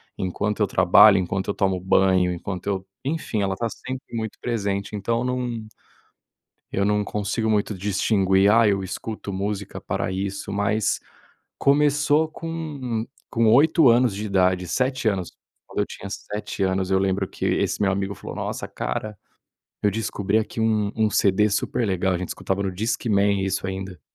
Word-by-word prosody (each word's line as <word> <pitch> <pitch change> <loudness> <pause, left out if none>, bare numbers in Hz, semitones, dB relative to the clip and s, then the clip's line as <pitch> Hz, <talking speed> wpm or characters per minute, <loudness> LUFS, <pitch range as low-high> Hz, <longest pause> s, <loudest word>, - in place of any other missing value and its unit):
enquanto 100 +3 -2
eu 105 - +3
trabalho, 95 +3 +6
enquanto 95 +1 -2
eu - - +1
tomo 95 -1 +1
banho, 95 -1 +3
enquanto 90 +2 -5
eu, 95 -2 -1 0.2
enfim, 140 -7 -2
ela 95 -1 0
está 115 +3 -1
sempre 130 +1 -7
muito 110 -1 -4
presente, 100 -3 -2
então 115 +4 -1
não 125 -3 -2 1.1
eu 100 - +1
não 105 0 +2
consigo 105 +2 -1
muito 105 0 +1
distinguir, 95 0 +2
ah, 115 0 +5
eu 100 -1 +1
escuto 105 +1 -5
música 100 +1 -3
pra 95 - -2
isso, 100 +1 -4
mas 100 +1 0 0.6
começou 150 +2 +3
com 150 -9 -4 0.2
com 115 -1 +2
8 150 +2 +6
anos 120 -1 +4
de 105 +2 -4
idade, 90 -2 +2
7 130 +3 0
anos. 95 -4 -1 0.3
Quando - - -6
eu - - +2
tinha 100 - -8
7 105 0 -6
anos, 95 0 0
eu 95 - +4
lembro 95 0 0
que - - -5
esse - - 0
meu 95 - +3
amigo 100 +1 -2
falou: - - -8
"Nossa, - - -4
cara, 105 +11 -4 0.7
eu 105 - +3
descobri 105 -1 0
aqui 110 +1 -3
um 110 -2 +1
um 110 -1 +2
CD 105 +1 +3
super 105 +3 0
legal." 95 0 +1
A - - -1
gente 90 - -4
escutava 95 +1 -2
no 95 - -1
Discman 100 -1 +1
isso 95 0 -1
ainda. 95 -1 -5
100 Hz, 165 wpm, -23 LUFS, 95-115 Hz, 1.1 s, trabalho